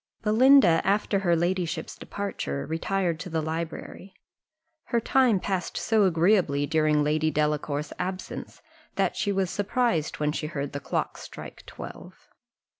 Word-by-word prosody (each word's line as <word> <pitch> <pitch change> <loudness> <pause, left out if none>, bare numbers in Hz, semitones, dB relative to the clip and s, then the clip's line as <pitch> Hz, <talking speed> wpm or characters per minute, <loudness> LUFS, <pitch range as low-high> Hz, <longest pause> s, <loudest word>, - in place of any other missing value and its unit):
Belinda, 220 - +6
after 200 +1 +1
her 175 -3 +2
ladyship's 175 -1 -1
departure, 185 - -4
retired 170 +1 -1
to 180 +1 -6
the 165 -1 -1
library. 165 +4 -5 0.7
Her 235 - +1
time 240 -3 +3
passed 190 -1 -2
so 220 -2 +3
agreeably 170 -5 +3
during 155 -1 +2
Lady 155 +1 +1
Delacour's 150 -1 -1
absence, 185 0 -5 0.3
that - - +1
she 205 - 0
was 190 -2 0
surprised 205 - 0
when 150 0 +1
she 150 0 -3
heard 145 -3 -4
the 140 - -3
clock - - -3
strike - - -10
twelve. - - -10
170 Hz, 135 wpm, -26 LUFS, 155-200 Hz, 0.7 s, Belinda